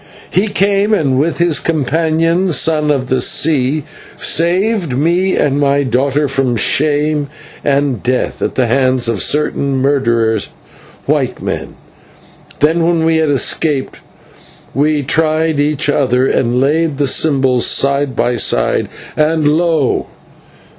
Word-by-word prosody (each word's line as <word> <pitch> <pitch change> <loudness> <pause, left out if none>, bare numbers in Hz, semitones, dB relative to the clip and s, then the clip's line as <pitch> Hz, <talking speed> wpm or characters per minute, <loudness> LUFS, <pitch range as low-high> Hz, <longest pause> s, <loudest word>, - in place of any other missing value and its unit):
He 195 +4 +1
came, 200 +1 +1
and 135 -8 0
with 165 +4 0
his 170 -4 +1
companion, 165 +3 0
Son 155 -1 +1
of 135 -3 0
the 130 0 0
Sea, 145 +1 +1 0.3
saved 175 - 0
me 175 +6 +1
and 145 -1 0
my 140 0 +2
daughter 135 +3 0
from 135 -2 0
shame 150 +4 +1 0.3
and 140 -5 0
death 125 +1 -2
at - - -2
the 130 - +1
hands 130 0 +1
of 115 -3 -1
certain 145 -2 0
murderers, 115 -6 0 0.6
white - - -1
men. - - -5 0.9
Then, 165 +3 +2
when 165 -1 +1
we 165 0 +2
had 160 -1 +1
escaped, 145 0 -1 0.7
we 145 +2 0
tried 155 +1 0
each 145 0 0
other, 130 -3 +1
and 125 -2 0
laid 150 +2 0
the 145 -1 0
symbols 130 -3 +1
side 140 0 +1
by 120 0 0
side, - - 0 0.3
and, 155 0 +1
lo! 160 -3 +1
145 Hz, 130 wpm, -14 LUFS, 130-160 Hz, 0.9 s, my